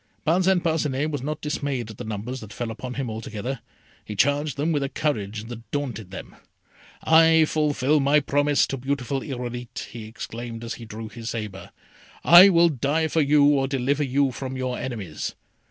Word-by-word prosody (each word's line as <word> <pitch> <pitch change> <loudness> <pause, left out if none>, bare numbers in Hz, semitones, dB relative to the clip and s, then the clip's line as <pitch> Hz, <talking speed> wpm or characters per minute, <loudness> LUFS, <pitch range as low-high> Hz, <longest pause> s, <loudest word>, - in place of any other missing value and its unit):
Parcin 185 +3 +3
Parcinet 155 -3 0
was 145 - -3
not 150 +3 -4
dismayed 140 -6 -3
at 110 - -13
the - - -4
numbers 110 +5 -5
that 110 -3 -10
fell 120 -1 -4
upon 125 +2 -6
him 135 -2 -2
altogether. 110 +3 -5 0.4
He 105 - -7
charged 145 +6 +1
them 150 +4 0
with 145 -3 +1
a 140 - -1
courage 110 -9 -2
that 115 -2 -10
daunted 120 -9 -4
them. 95 - -9 0.7
"I 160 0 +6
fulfil 150 -1 +1
my 140 +2 +4
promise, 145 0 +2
beautiful 135 0 -2
Irolite," 125 -2 -6
he 115 -2 -8
exclaimed, 115 +1 -7
as 115 - -4
he - - -7
drew 110 +1 -7
his 115 0 -7
sabre; 105 -5 -6 0.5
"I 175 +3 +10
will 170 -2 +5
die 155 +3 0
for 160 - +2
you 145 0 +4
or 140 -2 +3
deliver 135 +2 0
you 135 0 +1
from 130 +1 -5
your 130 -1 -2
enemies!" 105 -11 -5
135 Hz, 175 wpm, -24 LUFS, 115-150 Hz, 0.7 s, I